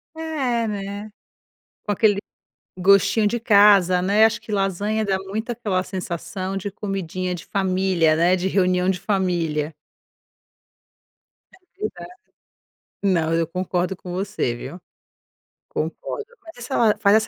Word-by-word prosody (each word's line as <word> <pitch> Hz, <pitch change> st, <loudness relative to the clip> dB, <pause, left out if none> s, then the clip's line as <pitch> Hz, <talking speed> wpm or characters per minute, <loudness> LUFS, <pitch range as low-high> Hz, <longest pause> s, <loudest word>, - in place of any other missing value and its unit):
É 270 Hz, -8 st, -1 dB
né? 205 Hz, +1 st, -5 dB, 0.7 s
Com 205 Hz, -, -2 dB
aquele 205 Hz, 0 st, +3 dB, 0.6 s
gostinho 200 Hz, +3 st, +4 dB
de 235 Hz, +3 st, -1 dB
casa, 200 Hz, -5 st, +5 dB
né, 205 Hz, +4 st, +4 dB
acho 225 Hz, +1 st, +1 dB
que 215 Hz, -, -9 dB
lasanha 205 Hz, +2 st, 0 dB
dá 190 Hz, -1 st, +1 dB
muito 205 Hz, +5 st, -5 dB
aquela 210 Hz, -6 st, -1 dB
sensação 185 Hz, +1 st, -4 dB
de 200 Hz, +1 st, -4 dB
comidinha 185 Hz, -2 st, -3 dB
de 175 Hz, 0 st, -7 dB
família, 185 Hz, -4 st, +2 dB
né, 175 Hz, +2 st, +4 dB
de 185 Hz, +1 st, -1 dB
reunião 180 Hz, -1 st, +2 dB
de 185 Hz, -1 st, 0 dB
família. 170 Hz, -6 st, -1 dB, 1.9 s
É 365 Hz, +2 st, -41 dB
verdade. 390 Hz, -4 st, -5 dB, 0.9 s
Não 165 Hz, -5 st, +2 dB
eu 165 Hz, -1 st, +1 dB
concordo 180 Hz, +1 st, -2 dB
com 180 Hz, -1 st, -9 dB
você, 190 Hz, -, -2 dB
viu. 140 Hz, +9 st, -8 dB, 0.9 s
Concordo, -, -, -4 dB, 0.2 s
mas 250 Hz, -7 st, -10 dB
faz 215 Hz, -5 st, +3 dB
essa 220 Hz, -, +2 dB
195 Hz, 125 wpm, -22 LUFS, 180-215 Hz, 1.9 s, casa